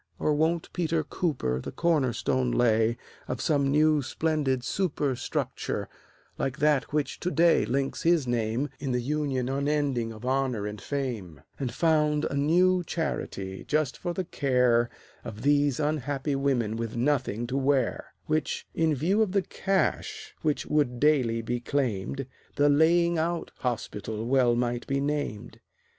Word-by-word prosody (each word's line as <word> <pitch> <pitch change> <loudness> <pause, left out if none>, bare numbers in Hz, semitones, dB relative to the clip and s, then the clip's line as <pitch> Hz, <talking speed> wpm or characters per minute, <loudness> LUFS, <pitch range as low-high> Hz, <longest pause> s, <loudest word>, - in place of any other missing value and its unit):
Or 150 - +1
won't 160 +3 0
Peter 165 -2 0
Cooper 95 - -1
The - - -6
corner 155 -7 +2
stone 130 +1 0
lay 115 -1 +3 0.3
of 130 - -3
some 140 -1 +1
new 155 +1 +4
splendid 135 0 0
super 145 -6 -1
Structure, - - -3 0.5
like 135 +1 -1
that 150 -3 +2
which 145 -2 -1
to 180 - -1
day 170 -1 +4
links 135 +2 -1
his 165 -4 +3
name 120 +3 -1
In 135 -2 -2
the 125 - +1
Union 135 -1 -1
unending 140 -3 0
of 110 +2 -9
Honor 130 -5 0
and 105 0 -6
Fame, 115 - -4 0.2
And 130 -4 -2
found 150 +1 +2
a - - -2
new 175 +5 +3
charity 100 - -4
just 150 -3 0
for 175 - -4
the 185 - -2
care 125 -5 +2 0.3
Of 110 0 -8
these 145 -1 +3
unhappy 145 -1 -1
women 125 -6 0
with 115 -1 -4
nothing 120 -3 0
to 125 +2 -4
wear, 135 -2 0
Which, 155 0 -1
in 160 -2 +2
view 180 - +1
of 205 -4 +1
the 195 -2 +2
cash 425 - -1
which 155 -3 0
would 140 -5 +1
daily 125 -6 +2
be 120 +2 -2
claimed, 130 0 -2 0.3
The 145 0 +4
Laying 170 +3 +4
out 170 +1 -2
Hospital 110 -2 -3
well 125 -1 +3
might 120 0 -1
be 135 0 0
named? 145 -7 -3
140 Hz, 150 wpm, -27 LUFS, 120-155 Hz, 0.5 s, new